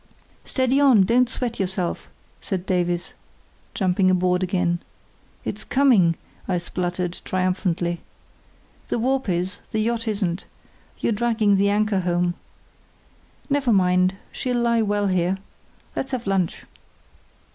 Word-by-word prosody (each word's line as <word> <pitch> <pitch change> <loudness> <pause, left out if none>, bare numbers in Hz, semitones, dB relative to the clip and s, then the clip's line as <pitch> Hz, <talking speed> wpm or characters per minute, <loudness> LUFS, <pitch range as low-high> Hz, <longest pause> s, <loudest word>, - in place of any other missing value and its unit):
"Steady 260 +1 +1
on! 255 -8 +6
Don't 240 +5 +3
sweat 235 -1 -3
yourself," 185 -2 -2 0.3
said 185 -2 -3
Davies, 175 -2 0 0.6
jumping 185 -1 +2
aboard 180 0 +2
again. 180 -2 0 0.7
"It's - - -3
coming," 230 -12 +4 0.3
I 185 - +1
spluttered, 180 0 -3
triumphantly. 180 -2 -1 0.9
"The - - 0
warp 260 0 0
is, 180 +2 -1
the - - -3
yacht 230 +1 -1
isn't; 195 -4 -1 0.5
you're - - 0
dragging 220 -2 +2
the 200 +1 +3
anchor 210 -1 +2
home. 175 -1 +1 1.1
Never 280 -4 +1
mind, 185 -1 +3 0.2
she'll 250 -1 -2
lie 235 -1 +3
well 205 -1 +1
here. 185 0 +1 0.6
Let's 265 0 -3
have 245 -2 -2
lunch." 195 -3 0
190 Hz, 120 wpm, -23 LUFS, 180-230 Hz, 1.1 s, on